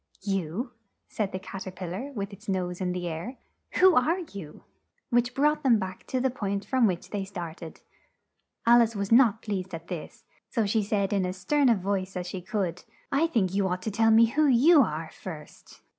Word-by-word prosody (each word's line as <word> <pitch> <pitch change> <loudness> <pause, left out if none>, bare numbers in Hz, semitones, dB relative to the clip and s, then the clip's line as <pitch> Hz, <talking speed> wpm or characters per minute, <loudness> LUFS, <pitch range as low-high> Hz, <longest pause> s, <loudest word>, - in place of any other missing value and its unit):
"You!" 195 - -2 0.4
said 205 -3 -2
the - - -3
Cat 190 0 -8
er - - -4
pil 180 -1 -7
lar 235 +11 -5
with 200 -3 -4
its 200 +2 -11
nose 180 -1 -2
in 180 -1 0
the 180 -1 -3
air. 170 +11 -5 0.4
"Who 370 0 +6
are 315 +6 +3
you?" 165 -7 -9 0.5
Which 240 +1 +2
brought 300 +2 +2
them 255 -5 +4
back 190 -2 -6
to 260 - -1
the 260 0 +1
point 200 -4 -3
from 255 -4 +3
which 180 -3 -3
they 205 -2 -2
start 175 -4 -7
ed. 165 -2 -9 0.8
Al 235 +1 +7
ice 230 -1 +1
was 200 0 -3
not 230 -2 +5
pleased 190 -4 -3
at 165 +1 -10
this, 175 -4 -7 0.3
so 225 -3 0
she 215 +2 +1
said 200 -1 0
in 195 -2 +1
as 180 +1 -3
stern 280 +8 +2
a 235 - +5
voice 190 -1 -2
as 180 - -3
she 180 +1 -5
could, 180 -2 -3 0.3
"I 305 +4 +3
think 205 - 0
you 195 -1 +1
ought 180 0 -3
to 220 - -2
tell 225 +2 +3
me 225 +1 +7
who 290 +7 +2
you 285 +5 +6
are 160 - -2
first." 160 -5 -11
200 Hz, 215 wpm, -27 LUFS, 185-235 Hz, 0.8 s, Al